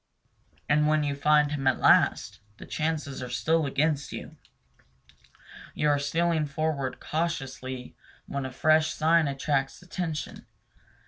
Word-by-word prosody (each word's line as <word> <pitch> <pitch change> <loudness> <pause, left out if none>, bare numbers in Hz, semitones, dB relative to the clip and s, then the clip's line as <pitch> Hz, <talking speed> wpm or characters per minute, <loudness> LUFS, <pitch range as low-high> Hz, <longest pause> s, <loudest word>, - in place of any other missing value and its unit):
And 150 +1 +3
when 155 0 +2
you 145 -1 -1
find 150 +1 +3
him 135 -3 -2
at 130 - +3
last, - - +3 0.2
the - - -10
chances 155 -3 -3
are 125 - -5
still 160 +1 +1
against 145 +1 0
you. - - -8 1.4
You 150 - +1
are 145 -1 +3
stealing 160 +2 0
forward 140 -3 -2
cautiously 135 -6 -4 0.3
when 140 -1 -4
a 130 - -5
fresh 155 +3 +3
sign 160 0 +3
attracts 135 0 -1
attention. 170 -5 -5
150 Hz, 130 wpm, -27 LUFS, 140-155 Hz, 1.4 s, And